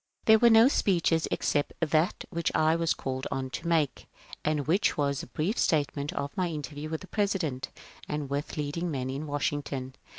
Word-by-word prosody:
There 220 0 +7
were 235 - +6
no 225 +1 +7
speeches 170 - +2
except 145 - 0
that 160 +1 +1
which 170 -1 -1
I 155 +1 +4
was 165 -1 +1
called 130 0 -4
on 130 -1 -3
to 170 - -5
n^ake, 160 -4 +1 0.4
and 150 -2 0
which 185 +7 +2
was 140 -2 0
a - - -9
brief 155 - -2
statement 145 -1 +1
of 140 -4 -4
my 185 -1 0
interview 150 -1 -5
with 160 0 -3
the 185 - -10
President 180 -12 -1 0.4
and 150 -1 -2
with 140 +3 -3
leading 150 +4 -2
men 130 -4 -2
in 145 +3 -4
Washington. 145 -2 -2
155 Hz, 185 wpm, -28 LUFS, 140-170 Hz, 0.4 s, There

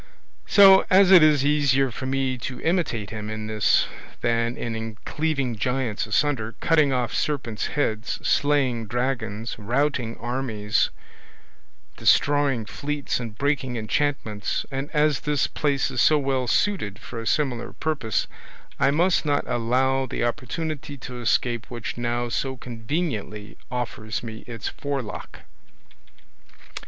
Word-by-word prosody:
So, 195 -1 +8
as 190 0 +6
it 185 -3 +10
is 150 -3 +5
easier 140 -3 +3
for 130 +3 -5
me 135 -1 0
to 125 +1 -5
imitate 155 - 0
him 105 -1 -5
in 110 0 -4
this 110 -2 +3 0.4
than 115 0 0
in 115 -1 -4
cleaving 140 -6 -1
giants 125 -1 -1
asunder, 115 -1 0
cutting 155 -4 +3
off 125 -2 -1
serpents' 120 -8 -1
heads, 110 -6 -1
slaying 135 -6 +2
dragons, 115 -2 -2
routing 120 +1 -1
armies, 115 -4 0 1.1
destroying 140 -5 +3
fleets, 145 +5 -3
and 115 -3 -7
breaking 140 -3 0
enchantments, 110 -2 -1
and 135 +2 -3
as 150 -2 +2
this 150 -2 0
place 140 -2 0
is - - 0
so 155 - +5
well 135 -3 0
suited 110 - 0
for 115 - -8
a 115 - -6
similar 130 -6 0
purpose, 130 -10 -1 0.5
I 140 0 +4
must 170 +5 +2
not 145 -2 +1
allow 130 +3 +1
the - - -3
opportunity 145 +4 -3
to 125 -1 -8
escape 120 0 0
which 120 -1 -5
now 120 0 -1
so 130 +2 -2
conveniently 115 - -4
offers 120 -3 -4
me 110 -2 -7
its 115 -4 -5
forelock." 140 -5 -5
130 Hz, 130 wpm, -24 LUFS, 115-145 Hz, 1.1 s, it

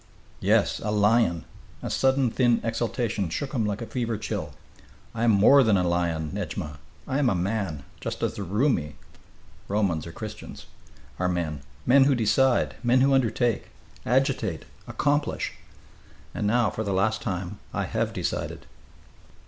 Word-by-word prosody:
"Yes, - - +2
a 105 - -2
lion!" 105 -4 +2 0.4
A - - -3
sudden 130 -2 +2
thin 120 -2 +3
exaltation 115 -4 -1
shook 135 - -3
him 115 -6 0
like 105 +2 -3
a - - -5
fever 115 -2 -2
chill. 105 - -4 0.6
"I 115 - -2
am - - +4
more 110 +7 +6
than 110 -5 +4
a 90 -1 +1
lion, 85 -3 0
Nedjma, 75 -2 -5 0.3
I 135 - 0
am 135 -4 +3
a 95 - +1
man 90 -5 -2 0.2
just - - -5
as - - 0
the - - -6
Roumi" 100 - 0 0.7
[Romans 95 -6 0
i.e., - - -7
Christians.] - - -8 0.5
"are 90 0 +1
men 80 -5 -2 0.2
men 135 +2 +6
who 140 -1 +4
decide 120 +3 +2
men 125 +1 +3
who 135 +1 +4
undertake 120 -3 +1 0.3
agitate 125 - 0 0.2
accomplish... 145 0 0 0.8
and 105 - -1
now, 115 0 +2
for 110 - -3
the 100 -2 -2
last 110 +4 +1
time, 95 -1 -4
I - - -1
have - - -1
decided. - - -3
110 Hz, 155 wpm, -26 LUFS, 90-125 Hz, 0.8 s, more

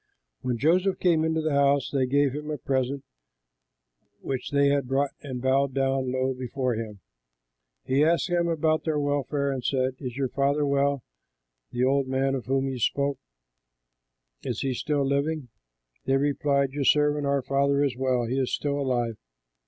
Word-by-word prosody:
When 125 -2 -2
Joseph 180 - +2
came 165 -3 +2
into 160 0 0
the 155 0 -1
house, 140 0 +2
they 135 -2 +1
gave 140 0 +2
him 150 +1 -6
the 155 -1 -3
present 135 +1 -1 1.2
which 130 -2 -4
they 140 -1 +3
had 140 -2 +1
brought 135 +1 +1
and 130 -3 -5
bowed 135 0 +2
down 135 -1 0
low 130 +1 0
before 130 0 -2
him. 110 -3 -6 0.8
He 135 +2 +2
asked 165 +2 +2
them 175 -1 +1
about 160 -1 +1
their 155 -2 0
welfare 145 0 0
and 130 -2 -4
said, 130 -1 0
"Is 125 -2 -6
your 135 -2 0
father 140 +2 +1
well, 140 -2 +1 0.7
the 120 +1 -1
old 135 +1 +2
man 135 +1 0
of 130 -3 -4
whom 135 +1 +1
you 130 -2 -4
spoke? 140 +3 0 1.2
Is - - -3
he 135 -1 -1
still 145 +3 -1
living?" 140 0 -1 0.6
They 135 0 +3
replied, 140 -1 +1
"Your 140 +1 -2
servant, 150 0 +3
our 140 -1 +1
father, 140 +1 +2
is 135 -4 0
well; 130 -2 0
he 130 +4 -1
is 130 - -1
still 145 -1 -1
alive." 120 -5 -1
140 Hz, 170 wpm, -26 LUFS, 130-145 Hz, 1.2 s, they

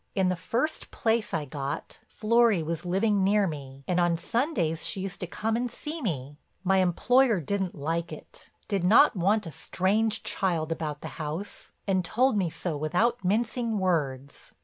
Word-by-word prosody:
In 190 -2 +3
the 180 - +1
first 235 - -2
place 225 -1 0
I 155 -2 -1
got, 140 0 -5
Florry 225 -5 +3
was 165 +2 -3
living 200 +2 +2
near 205 +1 +4
me 140 -5 -6
and 180 0 +1
on 175 -1 +3
Sundays 205 - -1
she 190 - -2
used 195 0 -5
to 180 - -4
come 220 +5 -1
and 245 +1 -1
see 310 +6 -6
me. 145 - -3 0.2
My 190 0 +3
employer 225 +5 +3
didn't 190 +4 -2
like 165 +3 -2
it—did 200 -4 -6
not 220 +10 +6
want 200 +4 +2
a 165 - -6
strange 210 +8 0
child 165 -4 -1
about 155 -2 -3
the - - -5
house 155 +7 -5
and 190 -3 +1
told 250 +8 +2
me 190 -4 +1
so 165 0 -3
without 190 +10 +1
mincing 225 +3 0
words. 140 -8 -2
185 Hz, 170 wpm, -28 LUFS, 165-220 Hz, 0.2 s, not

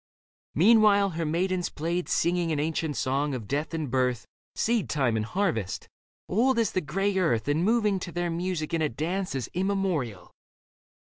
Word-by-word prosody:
Meanwhile 205 +2 +5
her 165 -1 -2
maidens 180 +3 0
played, 170 +3 -3
Singing 170 -1 +1
an 150 - 0
ancient 155 -1 -1
song 140 +2 0
of 115 -5 -6
death 145 +5 -2
and 155 -6 -3
birth. 125 -2 0 0.3
Seed 230 -2 0
time 130 -6 +1
and 110 - 0
harvest, 115 - -2 0.4
old 240 +6 +2
as 230 -2 +2
the 185 - 0
grey 195 +7 -1
earth. 120 -10 +1
And 150 +3 +1
moving 210 -2 +2
to 175 - -6
their 175 0 -2
music 170 -2 -3
in 165 - +1
a 155 - +1
dance 175 +7 -3
As 130 - -2
immemorial. 180 - -1
165 Hz, 170 wpm, -27 LUFS, 145-190 Hz, 0.4 s, Meanwhile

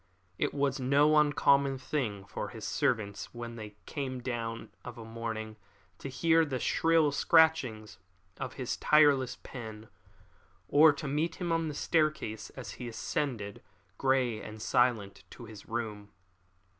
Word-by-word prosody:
It - - +1
was 140 -2 0
no 140 +4 +4
uncommon 140 -2 +3
thing 120 -8 -3
for - - -5
his - - -8
servants, 105 -2 -1
when 120 0 -6
they 105 -2 -9
came 135 -4 -4
down 115 -2 -4
of 120 -1 -8
a 115 - -8
morning, 110 -1 -5 0.4
to 140 - -6
hear 165 +4 +3
the 140 -5 -2
shrill 160 +3 +3
scratchings 140 - +3 0.4
of 135 -1 -5
his 130 -3 -3
tireless 145 -4 +4
pen, 110 -3 -8 0.8
or 155 +2 +7
to 145 +1 -6
meet 155 +4 -1
him 175 -2 -3
on 165 -1 +1
the 150 - -4
staircase 155 -10 0
as 130 - -7
he 125 - -4
ascended, 115 -4 -3 0.4
grey 130 -4 +1
and 110 0 -9
silent, 115 -5 +1
to 120 - -11
his 110 -2 -12
room. 110 -3 -4
130 Hz, 145 wpm, -30 LUFS, 110-145 Hz, 0.8 s, or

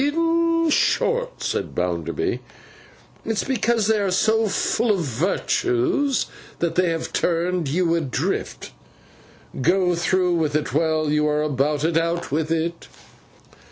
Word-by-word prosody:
'In 330 +2 +2
short,' - - +1
said - - -1
Mr. - - -15
Bounderby, 85 -2 -2 0.8
'it's 225 -1 -1
because 235 -4 +1
they 220 0 +2
are 200 -1 0
so 220 +4 +2
full 230 +3 0
of 200 -4 +2
virtues 145 - 0 0.3
that 170 -1 -1
they 180 -1 +2
have 165 -1 -3
turned 175 -1 0
you 170 +2 +1
adrift. 155 -6 -2 0.9
Go 180 +5 +2
through 180 +1 +1
with 155 -2 0
it 150 - -1
while 155 0 +1
you 150 0 +2
are 150 0 +1
about 145 0 0
it. 165 0 +1
Out 170 0 -1
with 155 +2 -1
it. 165 +1 -2
170 Hz, 135 wpm, -22 LUFS, 155-220 Hz, 0.9 s, In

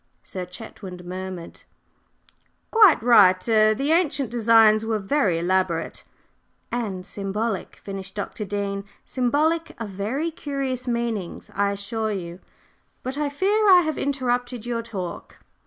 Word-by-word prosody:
Sir 185 -2 -6
Chetwynd 180 -2 -9
murmured: 185 -1 -7 1.1
"Quite 420 - +6
right 185 -6 +6
er 215 -1 +4
the 275 +6 -1
ancient 295 -7 +1
designs 225 -2 +5
were 220 -1 0
very 200 - +1
elaborate 175 -1 -1 0.4
" - - -45 0.3
"And 200 -7 -3
symbolic," 200 +1 -3
finished 195 -1 -8
Dr. 210 +1 -4
Dean. 200 0 -3 0.2
"Symbolic 300 +6 0
of 225 -3 -4
very 225 - -2
curious 275 -5 -4
meanings, 235 -6 -3
I 200 0 +1
assure 215 +2 -3
you. 175 -3 -5 0.6
But 260 +1 -4
I 295 -1 0
fear 405 +8 +2
I 365 -2 +8
have 315 -3 -2
interrupted 245 -3 -1
your 235 -1 -2
talk. 195 -7 -7
225 Hz, 130 wpm, -24 LUFS, 195-265 Hz, 1.1 s, I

